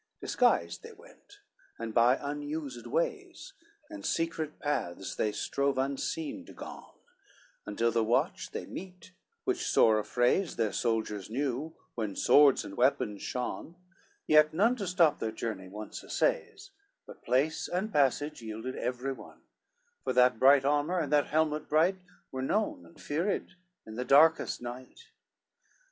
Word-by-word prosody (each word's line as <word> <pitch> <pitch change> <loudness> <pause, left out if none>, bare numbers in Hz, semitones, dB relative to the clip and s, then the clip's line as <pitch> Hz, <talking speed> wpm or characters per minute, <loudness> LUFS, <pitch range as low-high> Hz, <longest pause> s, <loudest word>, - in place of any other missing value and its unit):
XCIV - - -53
Disguised 85 0 +1
they - - -10
went, - - -19 0.4
and 115 -1 -5
by 120 +3 +5
unused 145 -3 -5
ways, - - -3 0.3
And 315 -1 -9
secret 165 -2 -2
paths 95 -11 -3
they 105 - 0
strove 140 +6 -1
unseen 140 +3 -2
to - - -12
gone, - - -10 0.7
Until 115 +3 0
the 115 0 +1
watch 115 +2 0
they - - -6
meet, 185 -1 -10 0.3
which 370 -2 -1
sore 110 -1 +4
affrays 125 - +1
Their 110 -2 0
soldiers 110 -4 -1
new, 140 +5 -2 0.2
when 110 -4 -3
swords 145 -2 +5
and 100 - -8
weapons 105 -4 +1
shone 125 +6 -4 0.5
Yet 155 0 +5
none 225 +8 +3
to 200 -4 -4
stop 170 -4 +3
their 110 - -2
journey 110 -4 -5
once 105 +3 -8
essays, - - -1 0.3
But - - -13
place 135 +6 +1
and 200 +5 -2
passage 145 +1 +1
yielded 110 +3 -6
every 125 +2 -2
one; - - -14 0.6
For - - -1
that 125 -2 +4
bright 135 +1 +6
armor, 145 +5 +1
and 150 -4 -1
that 145 -1 +3
helmet 155 0 0
bright, 165 +5 +3 0.3
Were 130 - -4
known 135 - -1
and 85 - -19
feared, 170 +8 -2 0.3
in 110 0 -9
the 125 - -1
darkest 155 -1 +4
night. 130 - -9
140 Hz, 145 wpm, -30 LUFS, 115-160 Hz, 0.7 s, bright